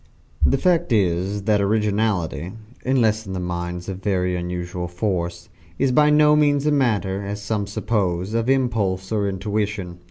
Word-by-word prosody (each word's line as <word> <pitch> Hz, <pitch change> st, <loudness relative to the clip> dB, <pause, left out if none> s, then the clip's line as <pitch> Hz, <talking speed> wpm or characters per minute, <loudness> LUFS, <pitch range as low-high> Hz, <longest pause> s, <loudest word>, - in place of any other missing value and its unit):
The 135 Hz, -, +4 dB
fact 175 Hz, 0 st, +1 dB
is 95 Hz, -1 st, +1 dB
that 105 Hz, 0 st, +2 dB
originality 100 Hz, -4 st, 0 dB, 0.3 s
(unless 110 Hz, -5 st, +1 dB
in 95 Hz, -1 st, -4 dB
minds 90 Hz, 0 st, -4 dB
of 95 Hz, -1 st, -5 dB
very 90 Hz, -3 st, 0 dB
unusual 90 Hz, 0 st, -4 dB
force) 90 Hz, -2 st, -3 dB, 0.3 s
is 135 Hz, -1 st, +2 dB
by 150 Hz, +3 st, +5 dB
no 150 Hz, 0 st, +5 dB
means 145 Hz, -1 st, +3 dB
a 150 Hz, -, +3 dB
matter, 105 Hz, -8 st, +1 dB
as 100 Hz, +1 st, -4 dB
some 100 Hz, 0 st, -2 dB
suppose, 100 Hz, -3 st, -1 dB
of 115 Hz, +2 st, 0 dB
impulse 110 Hz, -8 st, 0 dB
or 105 Hz, -2 st, +1 dB
intuition. 100 Hz, -2 st, -3 dB
100 Hz, 150 wpm, -22 LUFS, 90-115 Hz, 0.3 s, by